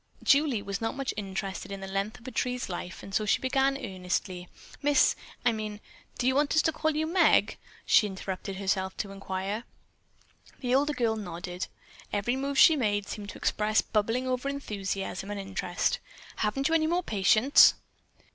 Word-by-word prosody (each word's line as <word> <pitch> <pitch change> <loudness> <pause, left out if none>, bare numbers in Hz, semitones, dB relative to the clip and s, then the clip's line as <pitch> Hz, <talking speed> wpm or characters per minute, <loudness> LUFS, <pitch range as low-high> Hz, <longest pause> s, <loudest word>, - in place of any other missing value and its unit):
Julie 280 -7 +3
was 200 +1 -4
not 225 - -2
much 275 -1 -2
interested 195 -1 -4
in 195 - -5
the 195 - -6
length 195 +5 -3
of 245 - -14
a - - -5
tree's 250 0 -2
life 180 0 -6
and 195 - -10
so 215 - +2
she 210 - +2
began 270 +1 +1
eagerly: 180 -4 -4 0.3
"Miss 290 0 +4 0.3
I 240 - +5
mean 215 -2 -5 0.4
do 245 - -1
you 260 - +4
want 285 +2 +2
us 315 - +4
to 320 - +2
call 315 0 -1
you 310 +1 +1
Meg?" 340 +2 +3 0.3
she 210 - +5
interrupted 190 0 -5
herself 190 -1 -1
to 200 - -4
inquire. 195 +2 -4 1.0
The 250 -2 -1
older 290 +3 +3
girl 230 -5 +1
nodded. 180 -2 -5 0.4
Every 210 +5 0
move 275 +1 -2
she 320 - +8
made 205 -6 0
seemed 205 -1 -6
to - - -8
express 215 +1 +1
bubbling 225 +4 0
over 255 +2 -1
enthusiasm 195 -7 -4
and 205 -1 -4
interest. 190 -2 -1 0.4
"Haven't 270 +6 0
you 325 - 0
any 315 -1 +3
more 350 +2 +1
patients?" 215 - +5
215 Hz, 175 wpm, -28 LUFS, 195-270 Hz, 1.0 s, she